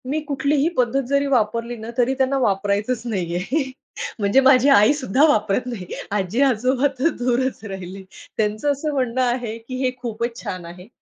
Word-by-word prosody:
मी 300 Hz, +3 st, 0 dB
कुठलीही 285 Hz, +2 st, +1 dB
पद्धत 255 Hz, +2 st, +2 dB
जरी 280 Hz, +1 st, +1 dB
वापरली 235 Hz, -2 st, 0 dB
ना, 220 Hz, +1 st, -8 dB
तरी 250 Hz, +1 st, +2 dB
त्यांना 265 Hz, 0 st, +1 dB
वापरायचंच 205 Hz, +2 st, 0 dB
नाहीये. 200 Hz, -, -2 dB, 0.5 s
म्हणजे 200 Hz, +5 st, +3 dB
माझी 265 Hz, 0 st, +5 dB
आईसुद्धा 270 Hz, +1 st, +4 dB
वापरत 215 Hz, -3 st, +1 dB
नाहीये. 210 Hz, -8 st, -6 dB
आजी-आजोबा 250 Hz, +6 st, +2 dB
तर 290 Hz, -, +3 dB
दूरच 250 Hz, 0 st, -1 dB
राहिले. 190 Hz, -1 st, -7 dB, 0.3 s
त्यांचं 215 Hz, +6 st, 0 dB
असं 290 Hz, +2 st, -2 dB
म्हणणं 255 Hz, -2 st, 0 dB
आहे, 240 Hz, -2 st, -1 dB
की 230 Hz, +3 st, -8 dB
हे 255 Hz, -, +2 dB
खूपच 235 Hz, 0 st, -3 dB
छान 185 Hz, -6 st, -5 dB
आहे. 180 Hz, +3 st, -11 dB
240 Hz, 150 wpm, -21 LUFS, 210-265 Hz, 0.5 s, माझी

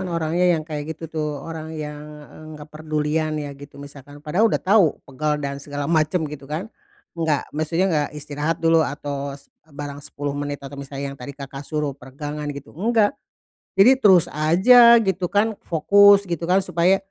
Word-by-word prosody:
kan 185 Hz, -, -4 dB
orangnya 170 Hz, +1 st, +1 dB
yang 155 Hz, -, -5 dB
kayak 155 Hz, 0 st, -5 dB
gitu 165 Hz, -, -9 dB
tuh 155 Hz, -1 st, -3 dB, 0.2 s
orang 160 Hz, -1 st, -7 dB
yang, 150 Hz, -1 st, -6 dB, 0.3 s
eee, 155 Hz, -, -13 dB
enggak 150 Hz, -, -10 dB
perdulian 155 Hz, 0 st, -2 dB
ya 145 Hz, -1 st, -5 dB
gitu 140 Hz, +1 st, -13 dB
misalkan 145 Hz, +1 st, -12 dB
padahal 195 Hz, +9 st, +2 dB
udah -, -, +1 dB
tahu 195 Hz, -5 st, +3 dB
pegal 150 Hz, +2 st, -2 dB
dan 140 Hz, -1 st, -5 dB
segala 145 Hz, 0 st, -5 dB
macem 160 Hz, +2 st, +1 dB
gitu 145 Hz, -2 st, -8 dB
kan, 175 Hz, +9 st, -5 dB, 0.4 s
enggak 160 Hz, -4 st, -1 dB
maksudnya 165 Hz, +5 st, 0 dB
enggak 150 Hz, -2 st, +1 dB
istirahat 150 Hz, +2 st, -3 dB
dulu 165 Hz, 0 st, +5 dB
atau 140 Hz, -2 st, -4 dB
s 140 Hz, -, -24 dB, 0.2 s
barang 145 Hz, -1 st, -7 dB
10 145 Hz, 0 st, -5 dB
menit 145 Hz, 0 st, -5 dB
atau 140 Hz, 0 st, -8 dB
misalnya 140 Hz, 0 st, -6 dB
yang 140 Hz, -, -13 dB
tadi 140 Hz, +2 st, -8 dB
Kakak 135 Hz, -1 st, -8 dB
suruh 150 Hz, -1 st, -3 dB
peregangan 145 Hz, +2 st, -7 dB
gitu 140 Hz, -, -11 dB
enggak. 215 Hz, +4 st, +2 dB, 0.6 s
Jadi 255 Hz, +7 st, +6 dB
terus 190 Hz, -7 st, +6 dB
aja 235 Hz, +11 st, +6 dB
gitu 185 Hz, -2 st, -1 dB
kan 215 Hz, +2 st, +1 dB
fokus 200 Hz, +4 st, +5 dB
gitu 170 Hz, -2 st, -4 dB
kan 190 Hz, +1 st, +3 dB
supaya, 175 Hz, +3 st, +2 dB
155 Hz, 180 wpm, -22 LUFS, 145-175 Hz, 0.6 s, Jadi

